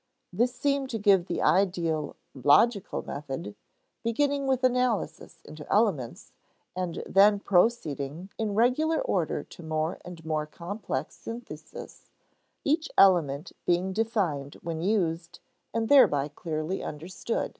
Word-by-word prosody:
This 245 +2 +1
seemed 275 +1 0
to 230 - -2
give 195 -4 +4
the 175 - -2
ideal 170 -5 +1 0.2
"logical" 185 - +3
method, 135 -8 -6 0.5
beginning 275 +4 0
with 260 -1 +1
analysis 245 -9 0
into 155 -1 -10
elements, 190 - 0 0.4
and 180 -2 -3
then 205 +1 +5
proceeding 175 -5 0
in 215 -2 -1
regular 255 +8 +2
order - - -1
to - - -14
more 160 0 -2
and 170 -2 -10
more 155 -1 -1
complex 180 +7 -5
syntheses, 230 +2 -9 0.5
each 310 +3 +1
element 170 -5 +4 0.2
being 180 +2 +1
defined 185 -11 -1
when 165 -1 -4
used, 175 -3 -1 0.3
and 225 -1 -1
thereby 150 - +5
clearly 155 +4 -4
understood. 175 +9 -4
185 Hz, 120 wpm, -27 LUFS, 160-230 Hz, 0.5 s, then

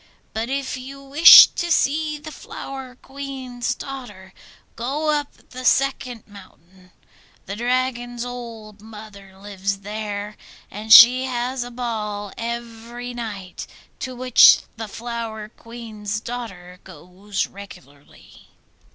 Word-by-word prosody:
But 225 +2 -3
if 275 0 -3
you 270 +2 -10
wish 290 +5 +10
to 345 0 -4
see 305 0 +1
the 300 +1 -10
Flower 270 -2 -9
Queen's 260 -3 -5
daughter 205 -9 -9 0.4
go 290 +6 -2
up 295 -1 -5
the 255 0 -8
second 255 -3 0
mountain: 185 -2 -17 0.6
the 200 - -6
Dragon's 245 0 -2
old 230 -4 -9
mother 210 -3 -13
lives 195 0 -4
there, 210 0 -6 0.3
and 215 +2 -7
she 250 +3 +9
has 250 0 -3
a 245 - -8
ball 215 -4 -5
every 235 +1 -6
night, 205 -6 -7 0.3
to 255 -1 -6
which 250 -1 +6
the 225 0 -6
Flower 225 -1 -6
Queen's 220 -3 -7
daughter 195 -7 -8
goes 185 +4 -5
regularly. 145 -8 -15
235 Hz, 115 wpm, -21 LUFS, 205-255 Hz, 0.6 s, wish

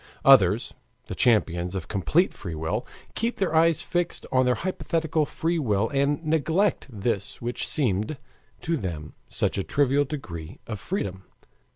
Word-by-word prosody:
Others 110 -6 +6 0.3
the - - -6
champions 90 -6 +2
of 90 -3 -4
complete 85 -10 +2
free 85 - -6
will 80 +10 -2 0.3
keep 230 +2 -1
their 190 -5 0
eyes 165 0 +4
fixed 175 -1 -2
on 130 -1 +3
their 125 - +3
hypothetical 165 -4 -1
free 165 +3 -1
will 110 -5 +1
and 140 +3 0
neglect 160 +5 +1
this 105 -3 -2
which 120 +1 -3
seemed 110 0 0 0.4
to 165 0 0
them 80 - -5
such - - 0
a - - 0
trivial 145 +3 +2
degree 85 - -7
of 110 -3 -5
freedom. 95 - -4
125 Hz, 150 wpm, -26 LUFS, 95-160 Hz, 0.4 s, Others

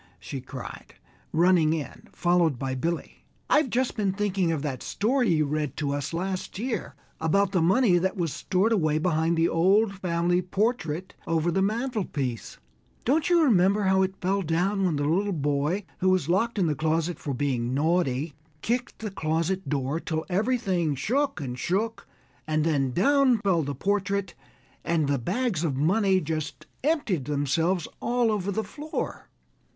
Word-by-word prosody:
she 95 +9 -6
cried, 130 0 -9 0.4
running 165 -1 +4
in, 155 -3 -6
followed 175 -5 +2
by 135 +1 -3
Billy, 165 +6 -3 0.3
"I've 295 -3 +4
just 250 +2 0
been 200 -4 0
thinking 195 -4 0
of 155 -3 -2
that 135 -4 -3
story 245 +4 +1
you 155 -3 +3
read 150 -1 -2
to 145 -2 -1
us 145 -1 -3
last 185 +3 -3
year 220 - -3 0.2
about 190 +5 +2
the 185 -4 +2
money 185 +1 +4
that 190 +3 -1
was 165 -5 -1
stored 190 +4 +1
away 155 -8 +2
behind 160 0 +1
the 165 +1 +3
old 195 +6 +3
family 175 -1 0
portrait 185 -3 -1
over 165 +1 +1
the 190 - +1
mantelpiece. 200 - -2 0.5
Don't 300 +7 +2
you 345 -2 +5
remember 200 - +4
how 190 0 +3
it 190 0 0
fell 195 +2 0
down 185 +4 0
when 170 -4 +1
the 145 0 -1
little 195 +6 +1
boy, 150 +5 0 0.2
who 185 - +2
was 185 -5 +2
locked 210 +7 +1
in 190 - +2
the 155 - +1
closet 160 +3 -1
for 140 -4 -3
being 125 -2 -1
naughty, 155 -2 +1 0.3
kicked 245 +2 -1
the 215 -2 -5
closet 165 +2 -1
door 140 +2 -1
till 160 -1 -3
everything 190 - 0
shook 275 - 0
and 125 -4 -5
shook; 220 +5 -1 0.4
and 155 0 +1
then 140 -5 +1
down 265 - +4
fell 195 -5 +1
the 140 -1 -3
portrait, 200 0 -1 0.5
and 165 -3 +1
the 140 -1 +1
bags 220 - -1
of 150 -5 0
money 190 +5 +3
just 155 -2 -4 0.2
emptied 260 - 0
themselves 155 +5 0
all 240 -2 +1
over 200 -2 -1
the 220 +3 -1
floor?" 305 +6 -5
175 Hz, 165 wpm, -26 LUFS, 155-200 Hz, 0.5 s, you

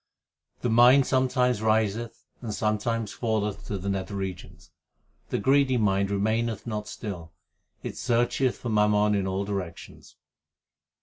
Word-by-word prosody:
The 120 - 0
mind 125 +4 +6
sometimes 125 -3 +1
riseth 110 +1 0 0.2
and 115 -3 -5
sometimes 110 +1 -1
falleth 110 -3 -2
to 100 - -3
the 95 +1 -6
nether 100 +1 -2
regions. 95 -2 -7 0.6
3 - - -1
The - - -5
greedy 135 -1 +3
mind 100 -3 +1
remaineth 110 +2 -1
not 105 -2 -4
still; 90 -7 -7 0.5
it - - -5
searcheth 120 +1 +1
for 120 - -5
mammon 105 -1 +3
in 100 -2 0
all 95 +1 -2
directions. 95 -4 -7
105 Hz, 135 wpm, -26 LUFS, 100-120 Hz, 0.6 s, mind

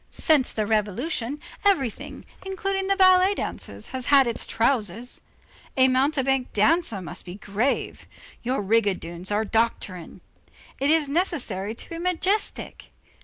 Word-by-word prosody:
Since 295 -5 +2
the 215 - -1
revolution, 230 - -1 0.2
everything, 300 - 0 0.2
including 385 0 -2
the 390 - +3
ballet 375 +1 +5
dancers, - - -6
has 255 -1 -4
had 280 -2 +6
its 235 -1 -2
trousers; 230 -1 0 0.6
a 260 0 +6
mountebank 270 -1 +1
dancer 220 - +2
must 155 - -7
be 175 0 -8
grave; 210 +6 -2 0.3
your 250 -2 -1
rigadoons 190 -4 0
are 210 +2 +1
doctrinarian. 210 -6 -2 0.6
It 275 - +1
is 315 -2 +3
necessary 250 - -2
to - - -7
be 335 - -5
majestic. 365 +4 -1
255 Hz, 125 wpm, -25 LUFS, 210-325 Hz, 0.6 s, had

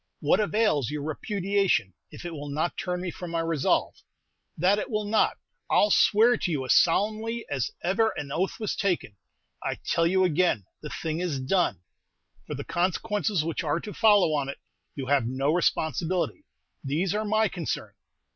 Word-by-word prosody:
"What - - +3
avails 210 - +1
your 150 -1 -4
repudiation 195 - 0 0.2
if - - -11
it 175 - -5
will 145 -2 -6
not 155 +4 -1
turn 180 -1 -3
me 180 -1 -3
from 180 +1 -7
my 165 0 -1
resolve? 165 -4 +1 0.6
That 190 +5 +3
it - - -4
will 215 -2 -1
not, 215 +1 +2 0.3
I - - +2
'll 210 - +4
swear 225 +5 +5
to 180 - -2
you 140 -4 -1
as 125 - +4
solemnly 220 +6 +2
as 135 -4 -1
ever 205 +6 +2
an 140 -1 -5
oath 180 +6 -1
was 215 - -2
taken. 180 - -1 0.5
I - - -1
tell 165 0 +2
you 185 +2 +3
again, 175 - +2 0.2
the 150 - -6
thing 160 +1 -3
is 170 -6 -2
done. 130 - +1 0.7
For - - -4
the - - -5
consequences 195 +1 0
which 165 +1 -2
are 150 +1 0
to 210 +3 -8
follow 205 -7 +4
on 140 -2 -1
it 140 - -6 0.4
you 135 - -4
have 135 -3 +2
no 135 +4 0
responsibility; 175 - 0 0.4
these 160 +8 0
are 210 +1 0
my 215 +1 +2
concern." 175 -5 -4
175 Hz, 180 wpm, -27 LUFS, 150-205 Hz, 0.7 s, swear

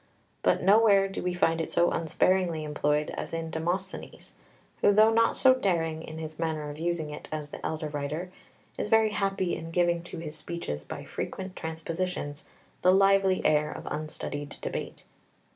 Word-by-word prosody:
But - - +2
nowhere 200 0 +6
do 195 - -5
we 180 0 -1
find 165 -2 +2
it 160 - -4
so 175 0 +3
unsparingly 165 0 +1
employed 150 0 0
as - - -4
in 165 -1 -4
Demosthenes, 180 +4 -4 0.5
who - - +6
though 215 +2 +6
not 230 0 +3
so 260 -1 +7
daring 165 -9 0
in 160 0 -8
his 155 -1 -7
manner 155 -2 -2
of 145 - -10
using 165 -2 -1
it 150 - -8
as 150 -1 -5
the - - -8
elder 155 0 -2
writer 150 +4 -4 0.5
is - - -2
very 220 -1 +4
happy 195 -3 0
in 165 - -7
giving 175 0 +2
to - - -7
his 160 -2 -6
speeches 75 - -5
by - - -7
frequent 190 -1 -5
transpositions 160 -2 -4 0.4
the 185 - +6
lively 195 -1 +4
air 150 0 +3
of - - -8
unstudied 150 -1 -5
debate. - - -5
165 Hz, 170 wpm, -28 LUFS, 155-190 Hz, 0.5 s, so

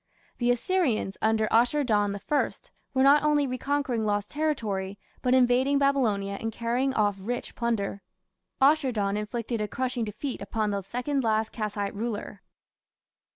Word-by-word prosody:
The 240 -1 +1
Assyrians, 245 - +1
under 220 0 +2
Ashur 245 +6 +3
dan 205 -5 +1
I, 295 -1 +2 0.5
were 260 - +4
not 280 +2 +6
only 295 -1 +3
reconquering 260 -2 -1
lost 205 -1 -1
territory, 215 -11 -2 0.2
but 255 0 +3
invading 260 +2 +3
Babylonia 220 -9 +1
and 225 - -2
carrying 240 +4 -1
off 205 -2 +2
rich 240 +6 -4
plunder. 215 -4 -2 0.6
Ashur 280 0 +4
dan 200 -3 -1
inflicted 225 +2 -3
a 210 - -1
crushing 250 +2 -2
defeat 230 +6 -5
upon 210 +1 -1
the 200 0 -1
second 250 +7 -2
last 220 -1 +1
Kassite 210 -2 -3
ruler. 205 -2 -4
235 Hz, 145 wpm, -27 LUFS, 210-265 Hz, 0.6 s, not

